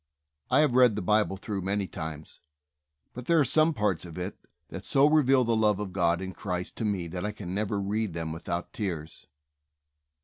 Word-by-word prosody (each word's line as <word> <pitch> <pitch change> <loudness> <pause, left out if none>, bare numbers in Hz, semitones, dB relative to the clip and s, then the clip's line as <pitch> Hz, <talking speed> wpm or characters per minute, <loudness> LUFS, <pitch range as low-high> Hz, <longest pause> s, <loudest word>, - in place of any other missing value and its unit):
I 130 +4 +5
have 150 -5 +2
read 125 -4 +5
the 105 - -2
Bible 105 0 +2
through 100 0 -4
many 100 +2 -1
times, 80 -3 -7 0.7
but 125 0 -8
there 170 -1 +4
are 145 - +4
some 155 +3 +4
parts 105 - 0
of 85 -2 -9
it 90 +2 -4 0.3
that - - -7
so 140 +1 +4
reveal 135 -4 +4
the 115 -1 +1
love 105 -2 +2
of 100 -3 -5
God 85 -2 +2
in 95 0 -5
Christ 90 -2 -4
to 115 - -2
me 100 -5 -1
that 90 +1 -5
I 105 - -1
can 100 -4 -7
never 105 0 -1
read 100 -1 -2
them' 80 -1 -3
without 85 +1 -4
tears. 85 -7 -5
100 Hz, 200 wpm, -28 LUFS, 90-115 Hz, 0.7 s, I